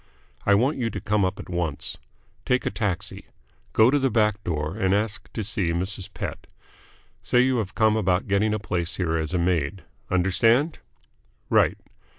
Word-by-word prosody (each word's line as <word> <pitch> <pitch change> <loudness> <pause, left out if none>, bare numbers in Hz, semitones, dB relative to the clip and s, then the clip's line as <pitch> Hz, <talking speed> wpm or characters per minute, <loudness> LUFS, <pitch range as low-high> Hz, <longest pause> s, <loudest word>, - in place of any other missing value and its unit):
I 100 - +6
want 130 +9 +2
you 120 -3 0
to - - -5
come 105 -1 +1
up 95 - -1
at - - -8
once. 85 -4 -3 0.4
Take 125 0 +1
a - - 0
taxi. 100 -2 -3 0.4
Go 110 +3 +5
to 145 - +3
the 135 -1 +2
back 105 -2 +1
door 75 0 -2
and 95 -3 +2
ask 105 +1 -2
to 110 - -3
see 100 -3 -1
Mrs. 95 +2 -3
Pett. - - -6 0.7
Say 125 - +3
you 130 0 +2
have 100 -4 -3
come 110 -1 +3
about 95 -4 +1
getting 100 +2 +2
a 105 - +1
place 90 -4 -2
here 85 -3 0
as 80 -1 -1
a - - +3
maid. 85 0 0 0.3
Understand? 115 - +2 0.7
Right. - - +4
100 Hz, 175 wpm, -25 LUFS, 90-110 Hz, 0.7 s, I